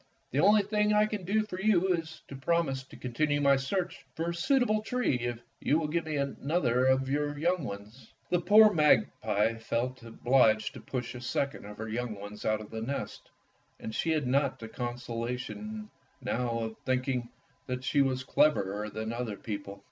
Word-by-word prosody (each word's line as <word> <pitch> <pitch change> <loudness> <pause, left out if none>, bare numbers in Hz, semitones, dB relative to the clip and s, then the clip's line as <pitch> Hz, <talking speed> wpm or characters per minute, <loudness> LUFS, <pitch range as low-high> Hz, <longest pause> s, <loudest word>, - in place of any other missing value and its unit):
The 135 - 0
only 205 +4 +6
thing 210 +1 +1
I 210 0 +5
can 210 -3 -4
do 215 +4 +2
for 190 -3 -6
you 190 -3 +3
is 160 -2 -5
to 140 - -8
promise 140 -1 0
to - - -14
continue 145 +4 0
my 140 -1 +5
search 180 +7 -2
for 165 +1 -1
a - - -4
suit 265 +9 +3
able 215 -3 +1
tree 245 - 0
if 120 -1 -2 0.2
you 150 - +2
will 160 -2 -1
give 165 +2 -1
me 155 - -2
another 140 -2 +1
of 130 0 +3
your 145 +1 -1
young 170 +2 +1
ones." 105 +2 -8 0.2
The 175 -1 +3
poor 210 +4 +7
magpie 115 - +2
felt 120 +3 -2
obliged 115 -2 +2
to - - -10
push 125 -3 -4
a 125 - -8
second 135 0 -2
of 105 0 -9
her 110 - -5
young 115 0 -3
ones 105 +1 -9
out 110 0 +1
of 105 - -11
the 110 0 -4
nest, 135 +5 -5 0.5
and 110 - -6
she 165 - -1
had 155 -3 +1
not 135 +2 +1
the 115 - -8
consolation 125 - -5 0.3
now 125 -1 -1
of 110 -1 -4
thinking 130 -2 -1 0.4
that 125 0 -3
she 140 +1 +2
was 130 -1 +1
cleverer 105 -8 +2
than 110 +2 -4
other 115 -3 -3
people. 100 -2 -6
135 Hz, 190 wpm, -30 LUFS, 115-170 Hz, 0.5 s, poor